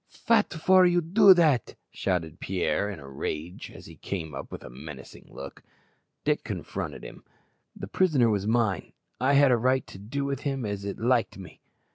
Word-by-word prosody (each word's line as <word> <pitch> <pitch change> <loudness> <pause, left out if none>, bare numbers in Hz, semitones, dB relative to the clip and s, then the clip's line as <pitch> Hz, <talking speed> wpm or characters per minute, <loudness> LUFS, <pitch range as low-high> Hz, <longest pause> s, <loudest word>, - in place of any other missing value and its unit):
"Fat 225 -2 +1
for 185 +3 +4
you 175 -1 +4
do 190 +4 +6
dat?" 155 -9 +2 0.2
shouted 85 -3 -2
Pierre 90 +1 -1
in 100 - -7
a 70 - -11
rage, 75 +5 -5
as - - -13
he - - -13
came 80 -6 -5
up 70 - -7
with - - -8
a - - -9
menacing 65 +1 -11
look. - - -10 0.6
Dick - - 0
confronted - - -5
him. - - -11 0.5
"The - - -6
prisoner 135 - +2
was 100 -1 -1
mine. 110 -3 0 0.3
I 130 +3 +2
had 140 -1 +6
a 120 - +4
right 130 +3 +1
to 95 - -12
do 140 +8 -4
with 140 0 -2
him 135 -4 -3
as 100 -1 -4
it 100 - -4
liked 120 -2 +1
me." 95 -2 -12
115 Hz, 185 wpm, -27 LUFS, 95-140 Hz, 0.6 s, do